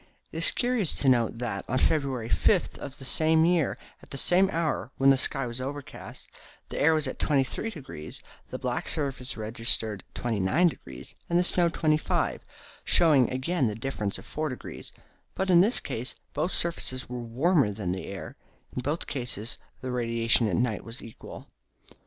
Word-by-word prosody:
It - - -7
is 165 - +4
curious 245 -8 +1
to 140 - +1
note 120 -3 +3
that, 120 0 -3
on 130 - +1
February 135 -5 +1
5 - - +2
of 140 0 -7
the 135 - -8
same 160 +3 +4
year, 170 -4 +2 0.2
at - - -17
the 135 - -5
same 185 +7 +4
hour, 160 -5 -1
when 135 0 +6
the - - +6
sky 135 0 0
was 120 +1 -5
overcast, 140 +1 -7 0.4
the - - -4
air 160 +2 +5
was 155 -1 +1
at 130 - -5
23°, 140 - -2 0.3
the - - -4
black - - -2
surface 135 -5 -3
registered 110 -2 -1
29°, 110 - 0 0.2
and 170 - +3
the 175 - +4
snow 175 -1 +3
25°, 155 -2 +1 0.4
showing 150 -8 +5
again 130 +2 0
the 105 - -2
difference 110 -4 -3
of - - -12
4°; 155 -4 -5 0.4
but, 190 0 0
in 175 -1 +8
this 220 +6 +2
case, 120 +3 -5 0.2
both 155 +5 0
surfaces 130 -6 0
were 125 0 -5
warmer 135 - +2
than 100 -3 -3
the 95 +1 -4
air. 100 -1 -7 0.4
In 125 - -1
both 145 +6 -1
cases 120 -5 -2 0.2
the 130 - -3
radiation 115 -1 +2
at - - 0
night 115 -3 0
was 115 +2 -8
equal. 115 - -10
135 Hz, 170 wpm, -28 LUFS, 115-160 Hz, 0.4 s, in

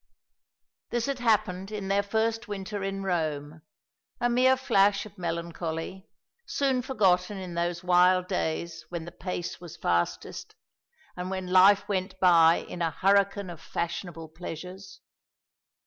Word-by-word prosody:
This 240 -1 -1
had 275 -2 -2
happened 215 -5 +1
in 205 -2 -4
their 200 +1 +2
first 225 +2 -1
winter 200 0 -5
in 195 0 -3
Rome 155 -4 -2 0.6
a 240 0 +1
mere 260 +2 +4
flash 200 -6 +3
of 210 - -13
melancholy 170 +1 -4 0.4
soon 265 -3 +1
forgotten 200 -7 +1
in 185 -2 -6
those 170 +1 -2
wild 180 0 +4
days 165 -3 -2
when 170 -2 -5
the 170 - -8
pace 175 -2 -5
was 175 -1 -10
fastest, 85 0 -2 0.6
and 180 +1 -4
when 190 -1 -3
life 190 +3 +5
went 190 -1 -2
by 170 -3 +5
in 175 - -7
a 165 - +2
hurricane 200 +2 +2
of 165 -2 -11
fashionable 170 -1 -4
pleasures. 180 +3 -9
185 Hz, 135 wpm, -28 LUFS, 170-200 Hz, 0.6 s, life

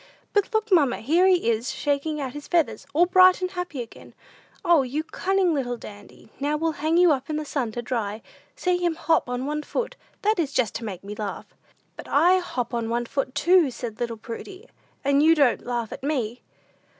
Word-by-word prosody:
"But 410 +1 +1
look, 440 -1 -1
mamma; 290 -9 +4
here 330 +10 +3
he 360 -10 +3
is, 230 +3 -2
shaking 290 +1 -1
out 265 -3 -4
his 295 0 -8
feathers, 330 -4 0
all 335 +4 +4
bright 370 0 +6
and 365 0 -2
happy 355 -8 -4
again. 230 - -15 0.5
O, 340 -4 +5
you 270 +4 -2
cunning 375 +1 0
little 245 -4 -2
Dandy, 205 -1 -13
now 290 +2 0
we'll 325 +1 0
hang 315 +2 +2
you 355 -2 +6
up 270 -1 -1
in 305 - -1
the 305 0 -3
sun 265 -6 -2
to 240 - -4
dry. 225 -3 -3 0.3
See 360 -1 +1
him 345 -2 0
hop 320 -5 +1
on 250 +1 -2
one 300 +1 -2
foot; 475 +10 -3 0.3
that 425 -1 +2
is 295 -4 -1
just 235 -6 +1
to 235 - -10
make 190 -4 -6
me 200 +1 -7
laugh." 210 -1 -5 0.5
"But - - -10
I 355 +6 +4
hop 255 -9 -4
on 230 -1 -2
one 240 +1 -1
foot, 270 +1 -3
too," 345 0 +4
said 235 -3 -7
little 235 -1 -3
Prudy, 370 - -9 0.4
"and 280 +1 +4
you 320 +2 +6
don't 280 -7 +2
laugh 240 -3 -2
at - - -9
me." 250 -5 -2
285 Hz, 210 wpm, -24 LUFS, 240-345 Hz, 0.5 s, bright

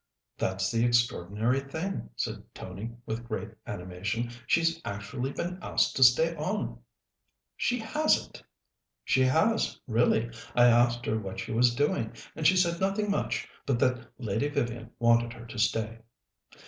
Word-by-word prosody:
"That's 95 +2 -1
the 115 0 +2
extraordinary 120 0 +2
thing," 160 - -4
said - - -3
Tony 95 +5 -6 0.2
with 110 +1 -4
great 110 - -4 0.2
animation. 100 +7 -3 0.2
"She's 165 0 +2
actually 120 +7 -4
been 180 +5 -4
asked - - +1
to 130 - +5
stay 160 +7 +5
on." 185 +7 -2 0.8
"She 245 - 0
hasn't!" 300 +7 0 0.6
"She 130 - +3
has, 160 +13 +2
really. 115 0 +2 0.2
I 120 - +6
asked 120 0 +4
her 110 0 0
what 95 -2 -6
she - - -5
was 120 +1 +3
doing, 120 -5 0 0.2
and 155 - +2
she 185 - +5
said 170 -1 +2
nothing 200 +2 +1
much, 115 - -1 0.2
but 135 -3 +2
that 125 -1 0
Lady 120 +4 -1
Vivian 120 -4 -2
wanted 120 0 +3
her 115 0 -11
to 115 -1 -7
stay." 110 +1 0
120 Hz, 150 wpm, -29 LUFS, 110-155 Hz, 0.8 s, I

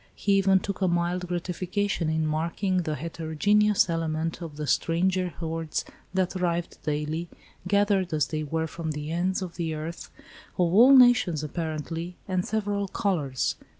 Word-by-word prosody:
He 200 - -1
even 195 -1 +4
took 200 0 -5
a 190 - +3
mild 175 +1 0
gratification 180 +1 -2
in 160 0 0
marking 170 +5 -1
the 160 -4 -1
heterogeneous 170 +8 +2
element 165 0 -2
of 160 -3 -7
the 150 - -3
stranger 180 +5 +1
hordes 165 -1 -3 0.3
that 185 0 0
arrived 175 -2 -2
daily, 150 +3 -2 0.4
gathered 200 -2 +2
as 150 -2 +2
they 155 -1 -2
were 160 +2 -1
from 160 -1 -4
the 150 +1 -5
ends 185 +3 0
of 175 -2 -8
the 165 -2 -2
earth, 160 +2 -6 0.5
of 175 -1 +2
all 250 +7 +8
nations 240 - +5
apparently, 165 +2 -4
and 185 -2 0
several 205 -2 -1
colours. 160 - -1
170 Hz, 150 wpm, -26 LUFS, 160-190 Hz, 0.5 s, all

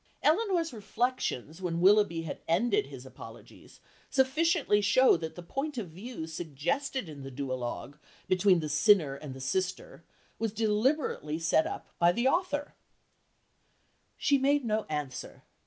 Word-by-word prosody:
Elinor's 340 - +2
reflections 210 - -2
when 170 -2 -2
Willoughby 190 -3 +4
had 160 - -6
ended 240 - +2
his - - -10
apologies - - -13 0.3
sufficiently 275 - +2
show 230 +6 +5
that 160 -1 -5
the 175 - -8
point 275 - -4
of 205 -7 -4
view 195 +1 -7
suggested 175 - -3
in 150 -3 -9
the 135 - -7
duologue 130 +1 -5 0.3
between 185 -1 +4
the 155 - -3
sinner 155 -1 +4
and 140 -1 -8
the - - -9
sister 180 +5 -3 0.4
was 225 -2 -1
deliberately 220 - 0
set 165 -1 +2
up - - -6
by 170 0 +5
the 235 +7 +1
author 290 -2 0 1.4
"She 280 -1 +3
made 280 0 +2
no 215 -1 0
answer. 145 -4 -5
200 Hz, 140 wpm, -30 LUFS, 160-265 Hz, 1.4 s, show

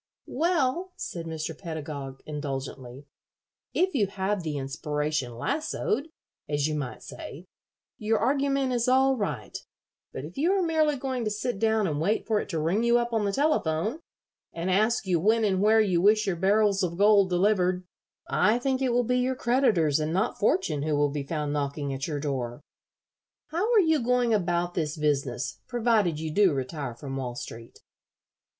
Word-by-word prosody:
"Well," 340 +3 0
said 165 -2 -6
Mr. 160 0 -4
Pedagog, 145 -5 -6
indulgently, 135 -3 -6 0.7
"if 375 +2 +2
you 215 -8 +2
have 195 0 -2
the 155 -3 -3
inspiration 145 -1 -2
lassoed, 285 - -1 0.4
as 145 -1 0
you 155 - -2
might 145 -4 -4
say, 165 +6 -9 0.5
your 220 +1 +1
argument 275 0 +1
is 240 0 0
all 265 +1 +4
right; 205 -5 -4 0.6
but 130 - -6
if 170 - -9
you 340 +6 +3
are 390 -2 +2
merely 315 -3 +2
going 260 -2 -3
to - - +1
sit 215 +1 -3
down 220 -1 +2
and 150 -4 -1
wait 205 +7 0
for 220 -2 +1
it - - -5
to 165 - -2
ring 175 +9 +1
you 235 0 +4
up 240 0 -1
on 220 -2 +1
the 200 - +1
telephone, 220 - 0 0.5
and 170 +3 -2
ask 215 +3 +2
you 180 -3 +1
when 220 +6 +3
and 190 -2 +1
where 220 +2 +5
you 185 -6 +2
wish 215 +3 +4
your 190 -3 0
barrels 200 +2 +2
of 170 -2 -2
gold 200 -1 +5
delivered, 180 -1 +2 0.4
I 210 +5 +3
think 260 +1 -1
it 260 - +2
will 245 +1 +3
be 250 +2 +1
your 255 +1 0
creditors, 225 - +2
and 155 +1 -1
not 195 +7 0
fortune, 185 -8 +1
who 150 0 0
will 145 0 +2
be 145 0 -3
found 150 0 -3
knocking 140 -1 -2
at 135 +1 -3
your 150 -3 -3
door. 130 -4 -3 0.9
How 365 +9 0
are 455 - +6
you 320 -5 +3
going 245 -1 +2
about 175 -3 0
this 155 -3 -2
business, 140 -4 -1
provided 220 -9 +1
you 160 0 -3
do 195 -3 +4
retire 135 -2 -4
from 135 +2 -6
Wall 125 -2 -4
Street?" 115 -1 -9
190 Hz, 180 wpm, -27 LUFS, 150-240 Hz, 0.9 s, are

